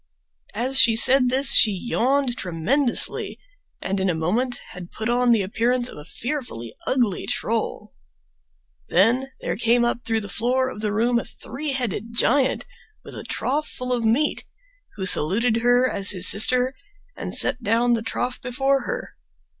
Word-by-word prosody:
As 255 +4 +3
she 230 -1 +5
said 255 +2 +6
this 265 +1 +3
she 220 - +6
yawned 245 +6 -1
tremendously, 235 - +2 0.5
and 195 +1 -3
in 190 0 -1
a 175 - -1
moment 225 +11 -2
had 180 -1 -11
put 220 +1 -5
on 245 0 +1
the 220 -4 +2
appearance 240 +5 -1
of - - -12
a - - -11
fearfully 235 - -7
ugly 240 -8 -1
troll. - - -4 1.0
Then 230 +9 +1
there - - -3
came 235 +1 +1
up 240 0 -3
through 225 -1 -2
the 205 - -7
floor 255 +5 -1
of 210 - -10
the 210 -1 -2
room 235 +3 0
a - - -6
three 275 +5 -7
headed 230 -3 -4
giant 265 +3 +1 0.4
with - - -10
a - - -8
trough 300 +4 -3
full 250 0 -5
of 240 -2 -2
meat, 240 +7 0 0.5
who 190 -3 -5
saluted 215 +8 +3
her 245 +2 +2
as 200 -4 +1
his 185 -3 +4
sister 250 +5 +4 0.4
and - - -4
set 250 - +3
down 235 +2 +1
the 230 - -1
trough 245 +2 -5
before 270 +2 -1
her. - - -6
240 Hz, 165 wpm, -21 LUFS, 210-255 Hz, 1.0 s, said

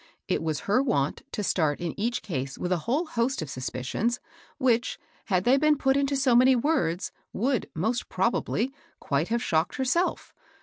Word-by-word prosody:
It - - 0
was 155 -3 -2
her 210 +6 +2
wont 145 - 0
to 210 - -3
start 155 -6 +1
in 170 -2 -3
each 235 +4 -1
case 135 -7 -4
with 180 - -3
a 180 - +3
whole 295 +8 +2
host 245 - -1
of 140 - -7
suspicions, 130 - -2 0.4
which, 240 -4 +1 0.3
had 185 -3 +1
they 255 +5 +5
been 305 +1 +3
put 270 -1 +2
into 280 0 +1
so 265 -3 +3
many 255 +2 +6
words, 245 - 0 0.2
would, 250 +2 0
most 225 +9 -1
probably, 235 +4 0 0.3
quite 145 +4 0
have 235 +1 0
shocked 160 +1 +1
herself. 265 +8 0
235 Hz, 175 wpm, -27 LUFS, 165-265 Hz, 0.4 s, many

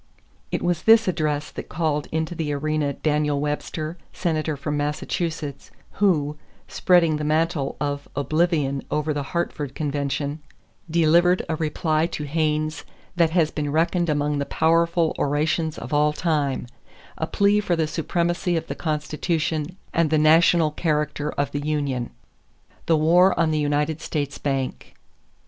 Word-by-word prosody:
It - - -2
was 175 -2 0
this 225 0 +6
address 155 -4 -1
that - - -8
called 155 -3 -1
into 160 +2 -1
the 160 -3 -3
arena 150 0 -1
Daniel 150 0 0
Webster, 155 +3 -3
Senator 155 -4 -1
from 150 +2 -3
Massachusetts, 150 0 -3 0.3
who, 150 -7 +2 0.3
spreading 170 -4 +3
the 150 - -4
mantle 155 -1 0
of 145 0 -3
oblivion 145 -1 +1
over 150 0 0
the 145 - -2
Hartford 145 -3 -3
convention, 145 0 -2 0.5
delivered 170 +2 +3
a 160 - -1
reply 155 0 0
to 150 - -5
Hayne 155 +1 0 0.4
that 170 -2 +3
has 160 -2 +2
been 145 -2 -3
reckoned 170 +2 +1
among 145 -1 0
the 140 - -1
powerful 165 0 +2
orations 155 +2 0
of - - -7
all 150 +1 +3
time 150 -5 0 0.5
a - - -1
plea 200 +1 +3
for 185 -4 0
the 160 -1 +1
supremacy 175 +3 -1
of 160 - -3
the - - -4
Constitution 155 +1 -2 0.2
and 165 -2 +2
the 155 - +3
national 160 +1 +5
character 150 -1 -1
of 145 -1 -1
the 145 - -3
union. 140 -5 -1 0.8
=The 165 - +4
War 175 +5 +4
on 165 -1 +3
the 155 - +1
United 150 +1 0
States 145 -3 -3
Bank. 135 -2 -3
155 Hz, 145 wpm, -23 LUFS, 145-165 Hz, 0.8 s, this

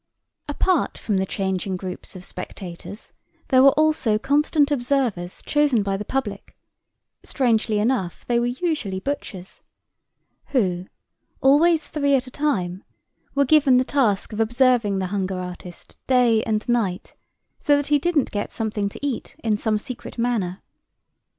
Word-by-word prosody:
Apart 320 +3 0
from 210 -4 -1
the 190 0 0
changing 190 -1 -2
groups 185 +1 -7
of 185 - -9
spectators 180 +3 -8 0.4
there 260 -2 +6
were 275 - +8
also 305 -8 +2
constant 290 +4 +2
observers 245 -9 -1
chosen 290 -7 +2
by 195 -1 -1
the 200 - -4
public—strangely 225 0 -3
enough 210 -6 -1
they 240 -1 +1
were 240 - 0
usually 245 - -2
butchers—who, 190 -3 -5 0.5
always 305 +3 +4
three 285 -2 +1
at 260 - 0
a 255 - -11
time, 195 -11 -1 0.5
were 280 0 +3
given 275 -2 +5
the 255 - +4
task 225 -8 +1
of 210 - -5
observing 235 -3 +2
the 190 - -1
hunger 190 -2 -1
artist 180 -1 -9
day 245 -4 +4
and 215 -1 -1
night, 220 -7 -1 0.5
so 290 - +3
that 285 0 -2
he 295 -1 +4
didn't 315 -3 +1
get 205 0 -3
something 215 -2 -2
to 280 - -7
eat 275 -5 -4
in 220 -2 +2
some 215 +1 0
secret 250 +3 -7
manner. 225 -7 -1
230 Hz, 140 wpm, -23 LUFS, 195-280 Hz, 0.5 s, were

